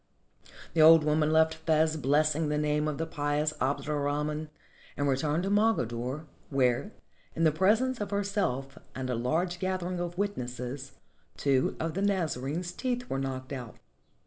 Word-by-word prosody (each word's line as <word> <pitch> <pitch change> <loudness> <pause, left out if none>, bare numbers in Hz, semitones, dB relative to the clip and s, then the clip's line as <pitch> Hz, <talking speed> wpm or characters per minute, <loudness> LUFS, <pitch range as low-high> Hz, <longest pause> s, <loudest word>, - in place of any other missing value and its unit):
The 160 - +3
old 160 0 +8
woman 150 0 +2
left 160 0 +4
Fez 160 0 +1
blessing 155 +2 +2
the 150 - 0
name 150 0 +1
of 150 -2 -2
the 165 - -1
pious 150 0 -1
Abd 140 +2 0
er 150 -1 -1
Rahman 150 +2 -2 0.5
and 145 - 0
returned 150 +5 +1
to 195 - -1
Mogador, 140 - 0 0.2
where, 130 - +1 0.4
in 165 - 0
the 160 - +5
presence 220 - +2
of 205 - -2
herself 195 -10 -1 0.2
and 130 -1 -3
a - - 0
large 165 +9 -1
gathering 185 -1 -2
of 175 0 -4
witnesses, 130 -8 -4 0.4
two 135 -2 +1
of 160 0 -2
the 195 - -2
Nazarene's 175 -4 -1
teeth 245 +1 -3
were 135 - 0
knocked 130 0 -4
out. 125 -5 -7
155 Hz, 160 wpm, -29 LUFS, 135-175 Hz, 0.5 s, old